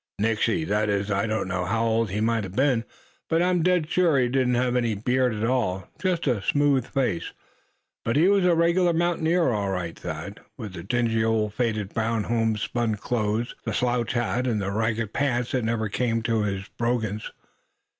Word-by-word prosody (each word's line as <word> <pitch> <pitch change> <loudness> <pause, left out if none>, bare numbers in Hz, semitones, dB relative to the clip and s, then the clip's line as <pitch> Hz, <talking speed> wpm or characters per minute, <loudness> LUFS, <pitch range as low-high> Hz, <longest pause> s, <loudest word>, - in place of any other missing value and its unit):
"Nixey; 115 +9 +1
that 105 -5 0
is 100 0 0
I 100 +2 +1
don't 110 -3 -1
know 90 -1 -1
how 115 +5 0
old 115 -1 +1
he 105 +3 -2
might 115 -1 +1
a - - -6
been; 125 +2 +1 0.4
but 165 +1 +2
I'm 180 -1 +2
dead 180 -2 +2
sure 175 -3 +3
he 125 -2 +2
didn't 125 -1 +1
have 125 0 +1
any 120 -3 +1
beard 125 +4 +1
at 105 - -3
all, 115 -7 0
just 180 -3 0
a 125 -7 +1
smooth 140 0 +2
face. 125 -11 -1 0.7
But 115 - 0
he 160 +5 +5
was 200 -1 +4
a 180 -1 +4
regular 170 +1 +3
mountaineer, 170 -2 +2
all 100 -3 -1
right, 90 -3 -3
Thad, 90 +5 -6 0.2
with 105 -7 -7
the 85 - -7
dingy 115 +3 0
old 110 -2 +1
faded 110 -4 -1
brown 115 -1 0
homespun 115 0 0
clothes, 110 +1 -1
the - - -3
slouch 120 -2 0
hat, 120 +1 0
and 115 -4 0
the 100 0 -2
ragged 110 0 -1
pants 125 -4 0
that 125 -3 0
never 115 -1 0
came 115 +1 -1
near 110 -2 +1
his 100 -1 -3
brogans. 110 -3 -2
115 Hz, 190 wpm, -25 LUFS, 105-130 Hz, 0.7 s, he